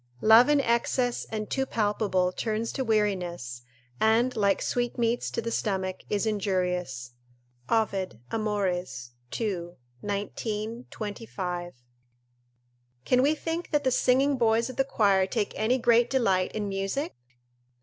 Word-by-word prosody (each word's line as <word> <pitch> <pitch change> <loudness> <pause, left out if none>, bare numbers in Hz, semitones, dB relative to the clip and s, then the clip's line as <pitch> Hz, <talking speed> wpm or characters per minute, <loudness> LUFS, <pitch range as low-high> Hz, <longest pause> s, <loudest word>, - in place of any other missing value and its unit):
["Love 225 +5 +7
in 295 -1 +5
excess 245 0 +1
and 215 -1 -5
too 270 - +1
palpable 205 -6 0
turns 220 +3 -2
to 265 - -2
weariness, 180 - -1 0.4
and, 230 +3 +3
like 200 -2 +2
sweetmeats 240 -1 0
to 230 - -3
the 230 - -3
stomach, 190 -4 -1
is 205 +1 0
injurious." 180 - -1 0.6
Ovid, 195 - 0
Amoy., 205 -5 0 0.6
ii. 190 -7 -2 0.3
19, 215 +3 -4
25.] 190 -5 -5 1.3
Can 250 0 +4
we 290 +4 +3
think 330 +2 -4
that 295 -2 +1
the 260 - +2
singing 265 +2 +3
boys 230 +1 +2
of - - -13
the 270 - +4
choir 200 -8 +2
take 210 +1 -2
any 235 +4 +2
great 240 -1 +4
delight 195 -8 +2
in 210 -1 -2
music? 195 +9 -2
215 Hz, 130 wpm, -27 LUFS, 195-240 Hz, 1.3 s, Love